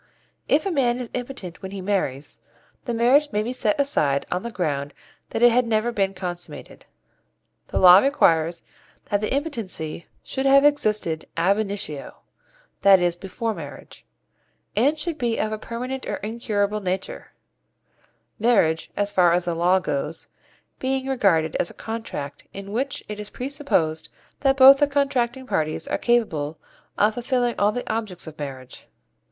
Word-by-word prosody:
If 305 +5 +3
a 390 - 0
man 250 -6 +1
is 245 -2 -6
impotent 245 -8 -6
when 190 - -6
he 195 0 -7
marries, 180 -8 -2 0.5
the 240 - -2
marriage 270 +6 +4
may 210 +1 0
be 240 +3 -3
set 220 -1 0
aside 150 - +1
on 180 - -1
the 235 - -5
ground 145 -9 -3 0.3
that 225 - -1
it 240 - +8
had 245 +1 +2
never 225 +1 +1
been 195 -3 -1
consummated. 175 -2 -7 0.8
The - - -3
law 180 0 +9
requires 170 - +2 0.5
that 205 0 +1
the 215 - -2
impotency 225 - -4 0.2
should 265 0 -2
have 275 +1 +6
existed 215 - +1
ab 185 +5 +3
initio 195 -9 -3 0.7
that 195 -1 +7
is, 175 -1 +1
before 220 +5 -4
marriage 145 -7 -10 0.7
and 275 +9 +3
should 320 0 -3
be 235 -2 0
of 215 - -1
a 215 - -3
permanent 250 +4 -5
or - - -2
incurable 210 -1 -2
nature; 190 0 -4 1.1
marriage, 200 -9 +2
as 205 0 0
far 180 -4 +4
as 175 0 +1
the 175 - -1
law 175 +3 +3
goes, 155 -2 -3 0.5
being 265 0 -1
regarded 190 - +2
as - - -1
a - - -14
contract 220 -11 -6
in 195 0 -8
which 265 +5 -2
it 210 0 -6
is 210 0 -6
presupposed 250 - -1 0.3
that 270 -1 +2
both 270 +1 +9
the 290 - +4
contracting 265 -3 0
parties 155 - -2
are 285 - -1
capable 160 -11 0 0.4
of 210 +1 +3
fulfilling 245 0 0
all 205 +1 +3
the 245 +3 -5
objects 215 -6 -4
of 155 -2 -11
marriage. 130 -3 -8
210 Hz, 160 wpm, -23 LUFS, 175-250 Hz, 1.1 s, law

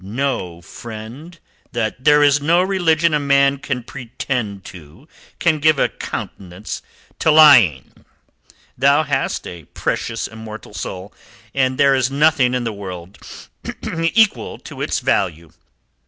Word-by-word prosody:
"Know, 100 -6 -3
friend, 120 - -10 0.4
that 120 +2 -3
there 150 0 +6
is 145 0 +4
no 170 +5 +3
religion 170 -4 +2
a 150 - +2
man 140 -1 +3
can 130 -3 -4
pretend 120 -5 -5
to 85 - -13 0.3
can 160 -3 +1
give 155 0 +3
a - - +2
countenance 95 +2 -7 0.4
to - - +2
lying. 125 - +5 0.7
Thou 140 +4 +3
hast 140 -2 -2
a 85 -3 -9
precious 115 +9 -3
immortal 110 -1 -10
soul, 95 0 -7 0.4
and 130 -1 +1
there 140 -1 +4
is 130 -1 +1
nothing 140 -3 +2
in 125 - -1
the 115 -2 -3
world 95 -2 -9 0.8
equal 170 - +2
to - - -10
it - - -1
in - - -18
value. 85 -3 0
130 Hz, 135 wpm, -19 LUFS, 105-150 Hz, 0.8 s, there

